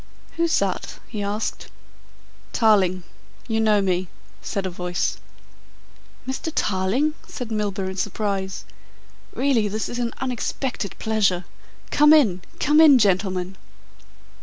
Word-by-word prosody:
"Who's 335 0 +2
that?" 195 -2 -2
he 215 -3 -5
asked. 205 +2 -3 0.9
"Tarling. 190 -5 +3 0.4
You 225 -2 0
know 215 -2 +4
me," 185 -1 0 0.3
said 195 -1 -3
a - - -1
voice. 180 0 -2 1.1
"Mr. 265 +5 -3
Tarling?" 210 +11 +1
said 245 -3 -6
Milburgh 200 -3 -2
in 190 - -9
surprise. 195 -1 -2 0.7
"Really 255 -6 +2
this 215 +2 -3
is 240 - -5
an 235 -1 -2
unexpected 250 -3 -3
pleasure. 195 -5 +1 0.5
Come 300 +1 +6
in, 215 - +4 0.2
come 300 +3 +5
in, 295 -4 +8
gentlemen." 190 -3 +1
210 Hz, 115 wpm, -23 LUFS, 190-245 Hz, 1.1 s, in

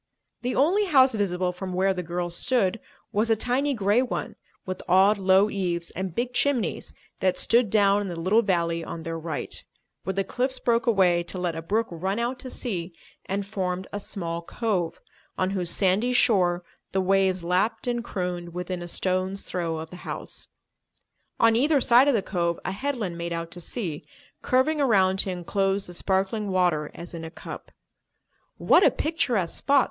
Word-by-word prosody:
The 250 +1 -2
only 365 +10 +3
house 270 -8 +5
visible 185 -4 0
from 185 +1 -6
where 190 +1 +2
the 180 - -3
girls 175 0 -3
stood 230 -2 +1 0.3
was 220 +1 +1
a 225 - +5
tiny 260 +5 0
grey 210 +2 +3
one, 255 - -3 0.3
with 185 -1 -5
odd, 195 +3 +5
low 190 +1 +5
eaves 175 -5 -2
and 185 -2 -5
big 245 +1 -1
chimneys, 250 - 0 0.3
that 185 -1 +1
stood 235 -2 +3
down 200 -1 +4
in 205 - -3
the 170 -2 -5
little 195 +7 +3
valley 170 -5 0
on 165 0 -6
their 165 -1 -4
right, 160 -2 -4 0.4
where 190 - -3
the 195 - +1
cliffs 255 +5 -1
broke 235 0 +1
away 185 -6 +4
to 170 - -7
let 175 -2 -2
a 165 - -4
brook 215 +7 0
run 190 +4 -2
out 240 +2 -2
to 255 - -6
sea 180 -10 -4 0.3
and 195 +1 -2
formed 185 -2 -3
a 205 - -2
small 170 -4 -4
cove, 185 -2 -2 0.4
on 185 0 0
whose 180 -3 -2
sandy 200 +7 +2
shore 180 -7 +3 0.3
the 190 - +2
waves 190 -1 +2
lapped 190 +8 0
and 240 -1 -1
crooned 180 -5 -4
within 180 0 -4
a 175 - -6
stone's 185 +2 -1
throw 170 -3 -3
of 160 0 -7
the 180 - -9
house. - - -7 0.9
On 230 -1 +5
either 285 +5 +3
side 245 +2 +5
of 280 - +4
the 205 - +1
cove 170 -3 -1
a - - -1
headland 210 -6 -3
made 170 0 -3
out 165 0 -4
to 175 - -6
sea, 175 -4 -4 0.4
curving 290 +4 +2
around 190 -7 +3
to 190 - +2
enclose 195 +2 0
the 175 - -5
sparkling 195 +3 -1
water 175 -5 +1
as 170 +1 -8
in 165 -1 -6
a 160 - -6
cup. - - -9 0.9
"What - - +5
a - - +7
picturesque 245 - 0
spot!" 280 0 +4
190 Hz, 185 wpm, -26 LUFS, 175-230 Hz, 0.9 s, a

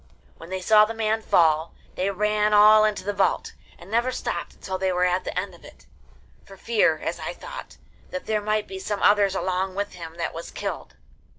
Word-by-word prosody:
When 165 - -12
they 190 0 -4
saw 210 +3 +6
the 225 +1 -6
man 220 0 0
fall, 160 -5 +2 0.2
they 190 +2 -1
ran 210 +1 +1
all 215 +1 +7
into 210 -3 -1
the 205 +2 -2
vault, 195 0 0 0.2
and 180 +4 -14
never 240 +3 +1
stopped - - -4
until 190 -1 -5
they 190 0 +1
were 180 0 +1
at 180 +1 0
the - - -2
end 190 0 -5
of 170 - -17
it, - - -16 0.6
for 195 - -14
fear, 210 -9 +2
as - - -4
I - - -4
thought, - - -10 0.3
that 185 - -6
there 215 -1 0
might 215 0 0
be 190 - -7
some 205 +1 -3
others 205 -2 +4
along 185 0 -1
with 205 +1 -3
him 165 -2 -9
that 170 - -3
was 165 +1 -7
killed. - - -6
195 Hz, 210 wpm, -24 LUFS, 180-215 Hz, 0.6 s, all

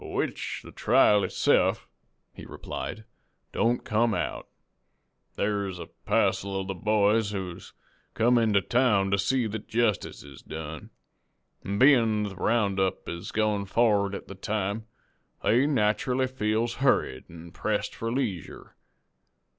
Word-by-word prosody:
"Which - - -3
the - - -11
trial 105 -1 +4
itse'f," - - +2 0.5
he - - -11
replied, 110 - -6 0.5
"don't 120 +1 +1
come 110 0 +1
out. - - -3 0.9
Thar's 100 -3 -1
a 85 - -7 0.2
passel 95 0 +1
of 95 - -5
the 95 - -2
boys 105 +2 +2
who's 95 -4 -6 0.4
come 120 +2 +4
into 105 -3 +3
town 105 -6 +2
to 100 - +2
see 125 +5 +1
that 110 0 -5
jestice 115 -3 -1
is 70 -2 -13
done, 80 -1 -7 0.7
an' 100 +1 -3
bein' 115 -5 +5
the 100 -2 -5
round 100 -1 +1
up 95 -1 -1
is 85 0 -6
goin' 105 -2 0
for'ard 100 -1 +2
at - - -8
the - - -8
time, 105 +2 -3 0.6
they 125 +6 +3
nacherally 125 0 +1
feels 115 -2 -1
hurried 65 - +1
an' 85 0 -11
pressed 105 +4 -2
for 115 0 -4
leesure. 115 -9 -4
105 Hz, 135 wpm, -27 LUFS, 95-115 Hz, 0.9 s, bein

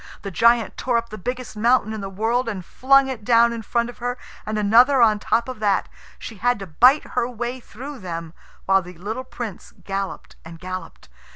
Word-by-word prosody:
The 195 - -5
giant 230 +5 +3
tore 245 -2 +1
up 230 0 -3
the 215 - -7
biggest 250 +3 -5
mountain 230 0 +2
in 215 - -5
the 195 - -5
world 230 +5 0
and 190 -5 -5
flung 275 +5 +4
it 255 -5 -5
down 235 +1 +4
in 230 - -5
front 235 +2 0
of 245 - -11
her, 245 +1 -3 0.3
and 215 0 -2
another 235 +6 +5
on 215 -3 +5
the - - -16
top 230 +2 +1
of 255 -3 -7
that. 205 -2 +1 0.3
She 225 - -9
had 245 +5 +1
to 195 - -7
bite 250 - +4
her 245 -1 -1
way 240 +1 -4
through 265 +4 -9
them, 165 -3 -6 0.3
while 195 0 +4
the 180 -1 -12
little 220 +8 -5
Prince 230 -7 -8
galloped 195 0 -5
and 165 0 -10
galloped. 185 +1 -7
230 Hz, 210 wpm, -22 LUFS, 195-245 Hz, 0.3 s, another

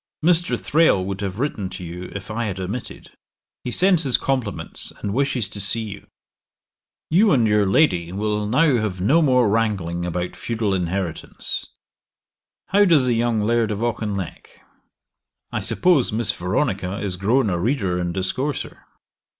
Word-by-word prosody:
Mr. 175 0 +3
Thrale 150 - +3
would 100 +1 -4
have 100 -1 -3
written 115 -7 -2
to 95 - -8
you 90 +1 -7
if 100 +1 -6
I 115 +2 -2
had 95 -3 -4
omitted; 100 +6 -6 0.5
he - - -3
sends 180 +5 +3
his 135 -6 +2
compliments 130 -7 -3
and 100 - -3
wishes 130 -4 0
to 100 - -8
see 105 +3 0
you. 100 -2 -8 1.0
'You 200 +5 +5
and 120 -7 +4
your 105 -1 +3
lady 90 - +2
will 105 +1 -1
now 135 +4 +3
have 105 -5 -2
no 135 - +4
more 125 -6 +4
wrangling 100 -6 0
about 90 0 -3
feudal 110 -4 -2
inheritance. 90 -1 -2 1.0
How 205 +1 +5
does 160 -8 +4
the 125 - +2
young 115 -1 +1
Laird 115 +1 +1
of 105 +1 -2
Auchinleck? 105 -6 -4 0.9
I - - -1
suppose 175 -8 +2
Miss 110 0 +1
Veronica 95 0 -1
is 100 -3 -2
grown 110 +4 +2
a 85 - -1
reader 95 -4 0
and 90 -1 -1
discourser. 125 +11 -3
105 Hz, 155 wpm, -22 LUFS, 95-125 Hz, 1.0 s, You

